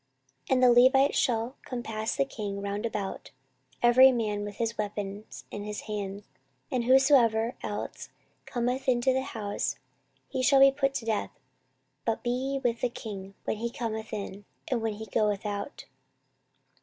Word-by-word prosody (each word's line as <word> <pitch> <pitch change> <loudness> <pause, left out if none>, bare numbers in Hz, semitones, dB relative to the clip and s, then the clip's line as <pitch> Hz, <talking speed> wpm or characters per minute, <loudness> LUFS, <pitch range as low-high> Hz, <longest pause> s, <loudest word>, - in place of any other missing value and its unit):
14:023:007 - - +4
And 255 - +2
the 245 - +9
Levites 270 +2 +5
shall 235 0 +1
compass 225 -3 -3
the 275 0 +2
king 205 -6 -5
round 200 +3 -2
about, 205 -3 -5 0.5
every 255 +2 +8
man 210 -4 -1
with 205 -1 -6
his 230 0 -2
weapons 205 0 -5
in 205 - -5
his 210 0 -5
hand; 205 -1 -5 0.5
and 245 -2 0
whosoever 250 -3 +5
else 205 0 -5 0.4
cometh 250 +2 -1
into 250 +1 +3
the 265 - +1
house, 210 -5 -3 0.5
he 260 - -2
shall 270 +1 +5
be 275 0 +8
put 275 0 0
to 230 - -3
death: 220 -2 -2 0.6
but 225 -1 -1
be 240 - 0
ye 265 +2 -1
with 235 -1 0
the 250 - +1
king 200 -5 -8
when - - -2
he 235 +2 -2
cometh 220 -2 -4
in, 200 -1 -6 0.2
and 250 -3 0
when 220 -1 -1
he 220 +1 -7
goeth 210 -1 0
out. 205 +5 -4
225 Hz, 165 wpm, -28 LUFS, 210-255 Hz, 0.6 s, the